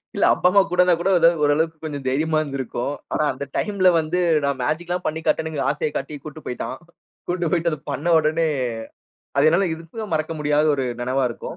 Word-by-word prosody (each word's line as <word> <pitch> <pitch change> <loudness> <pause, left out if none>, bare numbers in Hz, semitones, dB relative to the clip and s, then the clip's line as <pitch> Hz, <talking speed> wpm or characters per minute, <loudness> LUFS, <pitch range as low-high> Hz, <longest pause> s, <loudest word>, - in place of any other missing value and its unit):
இல்ல - - +3
அப்பா - - +2
அம்மா 200 +2 +5
கூட 180 +1 -3
இருந்தா 180 -1 +4
கூட 180 - 0 0.3
ஓரளவுக்கு 160 +2 +1
கொஞ்சம் 145 -4 -5
தைரியமா 155 +4 +1
இருந்திருக்கும். 135 -2 -3 0.2
ஆனா, - - +1
அந்த 135 +2 -6
டைம்ல 200 -3 +2
வந்து, 160 +3 -1 0.2
நான் 140 -1 0
மேஜிக்லாம் 175 +5 -2
பண்ணி 155 +1 -1
காட்டணும்ங்கிற 160 -3 0
ஆசையக் 150 +1 -3
காட்டி 150 - -5
கூட்டிட்டு 155 0 -10
போயிட்டான். 125 +1 -4 0.5
கூட்டு 175 -2 -1
போயிட்டு 170 -1 +1
அத 155 - -3
பண்ண 145 +4 -3
உடனே 160 +1 +1 0.9
அது 140 +2 +4
என்னால 175 +5 +3
எதிர்ப்பை 165 +7 -8
மறக்க 155 0 -1
முடியாத 150 0 +2
ஒரு 135 -2 -1 0.2
நெனைவா 130 +2 0
இருக்கும். 115 - -7
155 Hz, 180 wpm, -22 LUFS, 145-170 Hz, 0.9 s, அம்மா